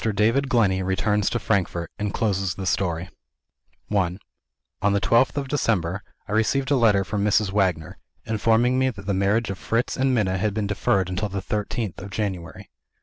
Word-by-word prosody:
DAVID 115 +6 +2
GLENNEY 100 -7 +2
RETURNS 100 +2 +1
TO - - -1
FRANKFORT, 90 -7 -1
AND 105 -1 -1
CLOSES 95 -4 -1
THE 95 - -5
STORY 85 -2 -1 0.9
I 90 -2 +1 0.6
On 100 0 +2
the 100 - +2
twelfth 115 +7 +3
of 140 -1 -1
December, 100 - 0 0.3
I - - -8
received 130 +6 +1
a - - +5
letter 110 -6 +4
from 100 +1 -2
Mrs. 105 -1 +2
Wagner, 95 -6 0 0.3
informing 115 +3 +2
me 130 0 +3
that 100 -5 -9
the 100 - 0
marriage 100 +3 +1
of 95 - -7
Fritz 115 +2 -1
and 130 0 +2
Minna 95 -4 +1
had 105 +1 -1
been 110 -2 -1
deferred 100 -2 +1
until 95 +3 -2
the 100 +1 -3
thirteenth 105 0 -3
of 100 - -7
January. 95 -1 -5
105 Hz, 180 wpm, -24 LUFS, 95-115 Hz, 0.9 s, a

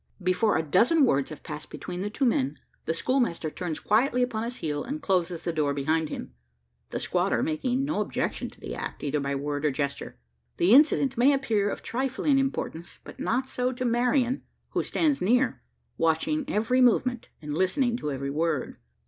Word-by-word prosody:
Before 185 +4 +2
a 160 - 0
dozen 235 - +4
words 140 - +1
have 155 - -9
passed 150 0 -7
between 180 0 -6
the 205 - -2
two 265 +6 -1
men, 140 - +1 0.3
the 160 - 0
schoolmaster 235 - 0
turns 170 -3 -4
quietly 250 +4 +2
upon 230 -3 -2
his 235 +2 -3
heel, 150 -7 -3
and 285 +5 -4
closes 180 - 0
the 170 - -2
door 145 -3 0
behind 155 +3 0
him 60 - -6 0.6
the - - -3
squatter - - +1
making 250 - 0
no 305 +2 0
objection - - -2
to - - -20
the - - -6
act, - - -6
either 150 0 0
by 140 0 -2
word 145 +1 -3
or 150 - +3
gesture! 140 - -3 0.4
The 180 +6 +4
incident 275 -3 +5
may 260 +4 +6
appear 220 -7 +1
of - - -5
trifling 270 +3 +1
importance; 175 -10 -3
but - - -12
not 255 +3 0
so 250 -1 -1
to 255 0 -3
Marian, 245 +2 +2 0.3
who - - 0
stands 300 -4 +1
near, 245 +7 +2 0.4
watching 165 - +1
every 250 0 +1
movement, 245 0 +2
and 150 -1 -5
listening 210 - +1
to 150 - -3
every 140 0 -3
word. 155 -2 -1
205 Hz, 185 wpm, -27 LUFS, 155-255 Hz, 0.6 s, may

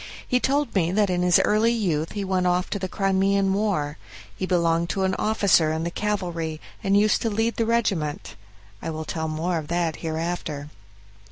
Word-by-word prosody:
He 250 - +2
told 280 +3 0
me 175 -4 +1
that 205 -2 +2
in 180 0 0
his 180 -1 +5
early 215 +2 +3
youth 170 -9 -1
he 205 -2 -3
went 185 -1 +1 0.2
to 200 - -1
the 185 - -2
Crimean 195 0 +1
War; 185 -8 -1 0.4
he 185 - -3
belonged 170 -1 +1
to 195 - -1
an 190 0 +1
officer 195 -7 +3
in 160 +1 -2
the 170 - -2
cavalry, 175 -6 -2 0.2
and 195 +1 +3
used 210 +1 +3
to 225 - 0
lead 225 +2 0
the 230 - +1
regiment. 195 -11 -1 0.5
I - - -4
will 160 0 -4
tell 160 0 -3
more 165 +2 -1
of 150 - -8
that 170 -1 -1
hereafter. 160 -3 -4
185 Hz, 185 wpm, -24 LUFS, 165-205 Hz, 0.5 s, his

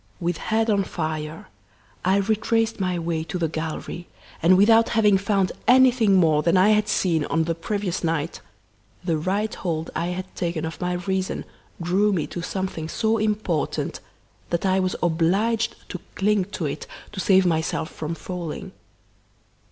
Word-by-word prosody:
With 175 -1 -1
head 225 +1 0
on 200 -1 +2
fire, 155 -3 -4 0.6
I 190 +2 +3
retraced 220 +2 +1
my 185 -2 0
way 165 -1 -2
to 180 - -4
the 170 -2 0
gallery, 160 +2 -5 0.3
and 180 +3 +6
without 225 +3 +5
having 210 -3 +5
found 195 -1 +1 0.2
anything 250 -5 +5
more 160 -5 +4
than 170 +4 +3
I 190 +3 +5
had 210 0 +3
seen 170 -7 +1
on 165 - +1
the 165 +1 -1
previous 190 +2 -3
night, 165 -1 -1 0.6
the 170 -3 0
right 195 +7 -1
hold 165 -3 -3
I 165 +2 -1
had 185 +1 -5
taken 170 -2 -2
of 160 - -6
my 180 0 0
reason 190 +1 -2 0.3
drew 190 +5 +2
me 165 -5 0
to 175 - -3
something 180 -3 -3
so 220 +3 +1
important 210 -7 -1 0.5
that 170 +2 -1
I 190 0 +3
was 185 -1 0
obliged 195 +8 +1
to 185 - -5 0.2
cling 205 -1 +2
to 185 -3 -5
it 145 - -4 0.2
to 210 - -7
save 190 0 +4
myself 160 -2 0
from 160 +2 -4
falling. 175 -3 -6
185 Hz, 160 wpm, -24 LUFS, 165-205 Hz, 0.6 s, and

